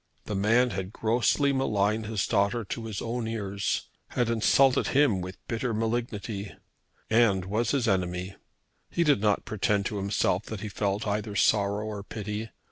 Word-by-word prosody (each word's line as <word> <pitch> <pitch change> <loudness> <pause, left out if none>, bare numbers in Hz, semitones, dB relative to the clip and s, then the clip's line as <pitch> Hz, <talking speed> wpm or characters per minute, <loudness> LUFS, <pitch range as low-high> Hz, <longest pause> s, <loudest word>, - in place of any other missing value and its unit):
The 105 - -4
man 115 +5 +3
had 95 0 -4
grossly 120 +6 +2
maligned 110 -4 +1
his 110 -2 -1
daughter 105 +2 +1
to 115 +3 -5
his 110 -3 -4
own 115 0 -2
ears, 100 -3 -2 0.2
had 120 -2 0
insulted 125 +4 +4
him 135 -9 +3
with 90 +1 -7
bitter 115 0 -2
malignity, 110 -3 -3 0.6
and 110 -5 +4
was 110 +4 0
his 130 -3 +1
enemy. 90 -1 -1 0.6
He 170 - +1
did 145 -10 +3
not 105 -1 +1
pretend 100 -2 0
to 105 - -2
himself 100 0 0
that 110 -3 -6
he 105 - -4
felt 100 +1 -1
either 105 0 -2
sorrow 100 0 +2
or 105 -2 -5
pity. 105 +2 -5
105 Hz, 160 wpm, -28 LUFS, 100-115 Hz, 0.6 s, insulted